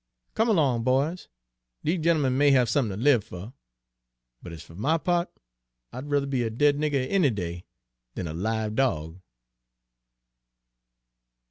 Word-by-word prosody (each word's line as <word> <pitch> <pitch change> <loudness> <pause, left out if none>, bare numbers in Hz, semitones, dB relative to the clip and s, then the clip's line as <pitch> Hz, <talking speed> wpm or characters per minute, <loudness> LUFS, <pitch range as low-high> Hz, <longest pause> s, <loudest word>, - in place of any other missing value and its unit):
Come 225 +2 +1
along, 140 - +2
boys! 140 +8 0 0.6
Dese 165 +2 0
gentlemen 155 -6 +2
may 145 +2 +4
have 130 -3 +4
somethin' 115 -5 0
ter 115 - -4
live 135 -7 +4
fer; 95 +8 -9 0.9
but 85 - -9
ez 80 - -9
fer - - -16
my 140 - +1
pa't, 175 +1 0 0.6
I'd 130 +4 -7
ruther 145 -1 +1
be 135 -2 -1
a 115 - -1
dead 145 +6 +2
nigger 145 -4 0
any 180 -3 +3
day 90 -5 -5 0.5
dan 90 - -4
a 80 - -5
live 110 +4 -2
dog!" 90 - -1
130 Hz, 145 wpm, -26 LUFS, 105-145 Hz, 0.9 s, may